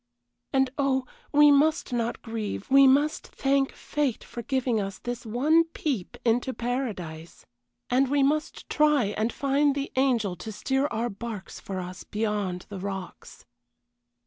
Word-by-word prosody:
And 265 -1 +2
oh, 265 -2 +1 0.3
we 295 0 +7
must 290 -1 +3
not 235 -1 -2
grieve, 225 -1 -5
we 275 0 +8
must 290 +4 +2
thank 275 0 +1
fate 290 -6 -2
for 240 - -7
giving 245 -2 0
us 195 -1 -5
this 245 -1 -6
one 295 +9 +4
peep 285 - -3
into 245 +3 +1
paradise 200 -10 -4 0.4
and 260 +1 +2
we 285 0 +3
must 300 +3 -1
try 295 -9 +3
and 220 +2 0
find 280 +1 +1
the 280 0 -3
angel 240 -8 +2
to 220 - -7
steer 265 +6 0
our 235 -1 -2
barks 205 -1 -7
for 190 -1 -5
us 180 0 -7
beyond 210 -4 -2
the 200 -2 -6
rocks. 190 -2 -7
245 Hz, 145 wpm, -27 LUFS, 210-275 Hz, 0.4 s, we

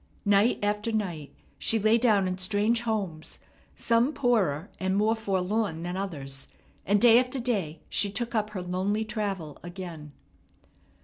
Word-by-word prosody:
Night 205 +3 +4
after 210 +2 0
night 175 -9 -3 0.3
she 225 - +2
lay 215 +2 +3
down 210 -5 +3
in 185 0 -3
strange 210 +4 +1
homes, 200 -9 -3 0.4
some 235 +5 +2
poorer 200 - +1
and 190 +1 0
more 215 +2 +3
forlorn 195 -4 -1
than 175 +1 -3
others; 140 -8 -5 0.4
and 205 +2 +4
day 235 +1 +7
after 255 +1 -1
day 205 -11 -2
she 205 - +1
took 235 +4 -3
up 215 -2 0
her 195 -4 -5
lonely 190 +4 -1
travel 200 -8 -4
again. 175 -4 -8
205 Hz, 145 wpm, -27 LUFS, 180-220 Hz, 0.4 s, day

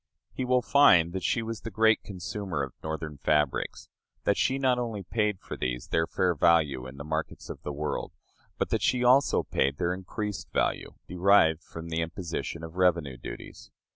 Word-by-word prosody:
He 130 - -3
will 125 0 +2
find 90 - +5
that 95 - -3
she 115 - 0
was 115 -1 -5
the 115 - -5
great 110 +1 +3
consumer 95 -4 -4
of 65 - -6
Northern 80 -2 -5
fabrics 75 -3 0 0.4
that 100 - +2
she 130 +6 +1
not 130 -2 +2
only 115 -5 -3
paid 105 0 0
for - - -7
these - - -3
their 80 0 +1
fair 90 -1 +1
value 75 -6 +2
in 65 +1 -11
the 70 - -6
markets 80 +1 -4
of - - -10
the 75 - -5
world, 75 +1 -3 0.5
but - - -2
that - - +1
she 125 -1 +2
also 130 +3 +4
paid 70 +1 0
their 90 0 0
increased 100 +2 -5
value, - - -1
derived 90 -3 +4
from 85 0 -9
the 80 0 -1
imposition 85 -1 -4
of 80 +2 -9
revenue 85 -7 +2
duties. - - -9
85 Hz, 185 wpm, -28 LUFS, 80-105 Hz, 0.5 s, find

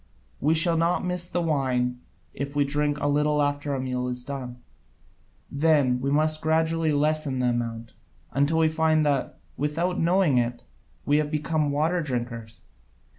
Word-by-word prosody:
We 155 +3 +2
shall 165 +1 +2
not 170 +2 +1
miss 180 -1 -2
the 175 -1 -1
wine 125 -5 0 0.3
if 140 +1 -5
we 145 -1 +3
drink 145 +1 0
a - - -2
little 150 +1 +2
after 145 0 0
the 135 - -2
meal 125 -1 -2
is 125 0 -4
done. 130 -3 -6 0.9
Then 140 -4 +2
we 135 - -1
must 155 +2 +1
gradually 160 0 +1
lessen 150 -2 +1
the 125 -1 +1
amount, 115 -1 -3 0.4
until 140 +5 +1
we 160 -1 +4
find 155 -1 +2
that, 140 -3 0 0.2
without 165 +5 -1
knowing 170 -6 +3
it, 120 0 -2 0.4
we 145 +1 +3
have 150 -1 0
become 150 0 0
water 160 +5 +1
drinkers. 120 -5 -5
145 Hz, 160 wpm, -25 LUFS, 130-160 Hz, 0.9 s, we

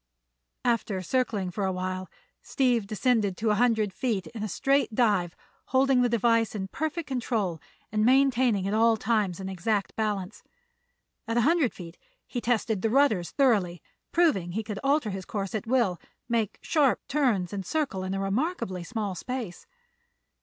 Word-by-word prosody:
After 230 -5 0
circling 210 -5 -1
for 200 +3 -3
a 190 - +1
while 185 0 -4 0.3
Steve 245 -6 +1
descended 215 -3 +1
to 220 -1 +1
a 210 - +1
hundred 220 -5 +2
feet 225 -8 -1
in 225 - -8
a 215 - -1
straight 275 +2 +1
dive, 205 -8 +2 0.3
holding 260 0 +3
the 245 - +3
device 230 -2 +2
in 190 -2 -4
perfect 315 - -3
control 225 - -2 0.3
and 215 0 +1
maintaining 250 -5 +3
at 200 - -1
all 225 +1 +4
times 210 -5 0
an 190 - -5
exact 195 +2 -1
balance. 210 -3 -2 0.9
At 230 +1 -1
a - - +4
hundred 320 -6 +3
feet 170 -2 -10 0.3
he 245 - -4
tested 225 -4 0
the 225 - +1
rudders 225 -9 +3
thoroughly, 205 - +2 0.3
proving 200 - +2
he 220 +3 -2
could 210 -2 -5
alter 275 -5 +2
his 190 0 -5
course 195 0 -4
at 220 +1 -3
will, 230 -8 +1 0.3
make 230 -4 -1
sharp 290 -5 +2
turns 235 - +1
and 195 -1 -3
circle 260 - -2
in 190 +1 -3
a - - -2
remarkably 195 - -2
small 205 +2 -3
space. 225 0 -6
220 Hz, 165 wpm, -27 LUFS, 190-250 Hz, 0.9 s, all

